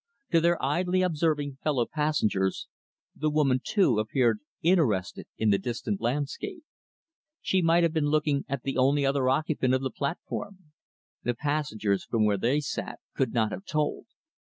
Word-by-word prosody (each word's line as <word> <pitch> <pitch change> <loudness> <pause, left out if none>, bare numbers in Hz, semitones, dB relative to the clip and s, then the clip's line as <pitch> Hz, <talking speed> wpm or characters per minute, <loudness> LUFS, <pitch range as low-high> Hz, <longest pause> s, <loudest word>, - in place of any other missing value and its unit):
To 165 - +4
their 170 +1 +3
idly 180 +6 +1
observing 150 -5 0
fellow 135 -6 +1
passengers, 115 - 0 0.5
the 155 - 0
woman, 140 -4 +2
too, 160 - +2
appeared 110 0 +1 0.2
interested 150 - +1
in 110 -1 +2
the 100 - +3
distant 120 - -3
landscape. 150 - -3 0.8
She 190 - +1
might 170 +1 +4
have 165 -2 +2
been 155 -3 +1
looking 150 -2 +1
at 140 -2 -3
the 135 -1 -2
only 140 +2 +3
other 135 -1 +2
occupant 135 -2 +1
of 130 - -1
the 130 - -2
platform. 175 +3 -5 0.5
The 120 0 -1
passengers, 130 -9 -1
from 110 -2 +1
where 105 -1 +2
they 130 +8 +1
sat, 140 - -5
could 130 -4 0
not 110 -3 +1
have - - -6
told. 150 -5 -2
145 Hz, 155 wpm, -27 LUFS, 120-160 Hz, 0.8 s, To